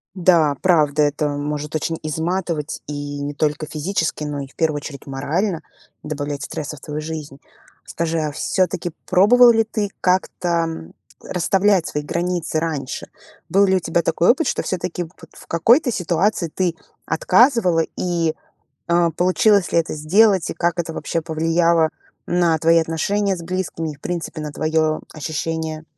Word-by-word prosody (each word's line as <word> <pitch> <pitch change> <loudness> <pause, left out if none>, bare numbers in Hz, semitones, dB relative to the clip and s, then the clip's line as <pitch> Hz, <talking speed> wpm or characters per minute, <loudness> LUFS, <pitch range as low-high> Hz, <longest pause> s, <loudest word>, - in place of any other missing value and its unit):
Да, 170 -5 +4
правда, 150 -5 +3
это 145 +1 0
может 150 +1 -4
очень 160 +1 -1
изматывать, 160 0 -2
и 145 0 -5
не 145 +1 -3
только 150 +1 -1
физически, 160 +1 -2
но 150 -1 -3
и 135 - -6
в 135 - -23
первую 160 -3 +1
очередь 145 -1 -8
морально 160 +7 -2 0.4
добавлять 145 -1 -4
стресса 150 0 -5
в - - -13
твою 150 0 -5
жизнь. 155 -3 -6 0.5
Скажи, 165 0 -2
а 155 -1 -1
всё-таки 175 +2 -1
пробовал 235 +7 +6
ли 225 -1 +3
ты 215 -2 -2
как-то 170 - 0 0.3
расставлять 190 +1 +2
свои 150 - -3
границы 170 0 -1
раньше? 155 -5 -4 0.4
Был 200 +2 +4
ли 190 -1 +3
у - - +3
тебя 170 0 0
такой 170 +1 +1
опыт, 275 +4 -1
что - - -1
всё-таки 180 -1 -3
вот 170 +1 -13 0.2
в - - -14
какой-то 240 - +3
ситуации 180 -1 0
ты 180 -3 0 0.3
отказывала 230 - +3
и, 170 -3 0 0.5
э, 170 0 +3
получилось 185 +2 +3
ли - - +4
это 165 - -1
сделать, 190 +5 +3
и - - -5
как 170 0 0
это 170 -1 -2
вообще 165 0 -3
повлияло 165 +1 +2 0.4
на 175 -2 +2
твои 165 +1 +4
отношения 190 +5 0
с 170 - -8
близкими, 170 -2 -3
и - - -13
в - - -34
принципе 170 -2 -4
на 150 -1 -5
твое 155 0 0
ощущение? 160 0 -3
165 Hz, 155 wpm, -21 LUFS, 155-180 Hz, 0.5 s, пробовал